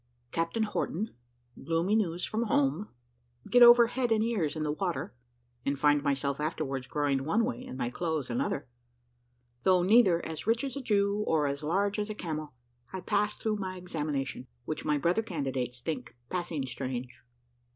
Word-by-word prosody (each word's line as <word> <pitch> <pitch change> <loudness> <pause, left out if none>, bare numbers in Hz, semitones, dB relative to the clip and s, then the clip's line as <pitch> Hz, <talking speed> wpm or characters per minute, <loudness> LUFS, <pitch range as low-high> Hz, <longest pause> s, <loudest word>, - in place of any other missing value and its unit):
CAPTAIN 165 +7 0
HORTON 210 - -2 0.5
GLOOMY 165 +5 +1
NEWS 180 -5 0
FROM 225 +2 -1
HOME 145 +4 +1 0.6
GET 245 - +6
OVER 240 0 +10
HEAD 245 0 -1
AND 220 -1 +3
EARS 195 -11 0
IN 155 - -2
THE 150 - 0
WATER, 175 -1 -2 0.5
AND 140 0 0
FIND 145 +1 +4
MYSELF 140 0 0
AFTERWARDS 140 -4 -2
GROWING 140 -2 0
ONE 215 +10 +2
WAY, 120 - -4
AND 130 - -8
MY 120 -2 -2
CLOTHES 160 -4 -2
ANOTHER 120 - -1 0.9
THOUGH 185 +2 +4
NEITHER 190 -4 +5
AS 160 +4 -6
RICH 230 +2 +2
AS 275 -1 -3
A 280 - -3
JEW, 205 -3 +1
OR 155 -2 +2
AS 140 0 -2
LARGE 200 +6 +1
AS 210 +1 -2
A 215 - -4
CAMEL, 155 -5 -4 0.4
I 190 - -5
PASS 210 +3 0
THROUGH 215 -1 -1
MY 190 -2 -4
EXAMINATION, 150 -7 -3 0.2
WHICH 155 - -3
MY 150 -1 +2
BROTHER 170 +9 +2
CANDIDATES 135 - -3
THINK 130 -6 -4 0.2
PASSING 170 -6 -2
STRANGE. 125 -1 -5
165 Hz, 170 wpm, -30 LUFS, 140-210 Hz, 0.9 s, OVER